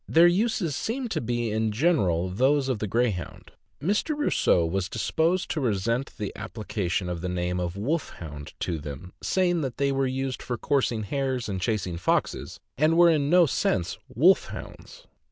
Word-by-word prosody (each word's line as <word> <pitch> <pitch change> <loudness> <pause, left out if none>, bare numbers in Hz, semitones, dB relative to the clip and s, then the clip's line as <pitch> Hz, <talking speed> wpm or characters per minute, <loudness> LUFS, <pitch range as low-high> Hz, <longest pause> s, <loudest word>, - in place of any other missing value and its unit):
Their 165 +2 +6
uses 180 - +2
seem 245 - -2
to - - -1
be 120 -1 -1
in 110 0 0
general 105 - +2
those 135 +6 +2
of 125 -5 -1
the 105 - -2
Greyhound. 105 -5 -2 0.3
Mr. 210 - 0
Rosseau 90 - +2
was 95 +3 -1
disposed 160 - 0
to 155 - -1
resent 115 +2 -1
the 105 -4 -4
application 100 -4 -3
of 90 -2 -4
the 90 - -3
name 90 0 -1
of 90 +1 -3
"Wolfhound" 90 - -4
to 85 -3 -1
them, 75 +4 -8
saying 175 -3 +1
that 130 -4 -4
they 140 0 +1
were 135 0 +1
used 130 0 -3
for 120 - -3
coursing 120 -4 0
hares 130 +2 -2
and 95 -3 -3
chasing 95 -4 -1
foxes, 85 - -1 0.2
and 155 +2 +4
were 175 0 +7
in 145 -3 +1
no 175 +1 +6
sense 90 - 0
wolf 175 - +4
hounds. - - -10
120 Hz, 170 wpm, -26 LUFS, -, 0.3 s, were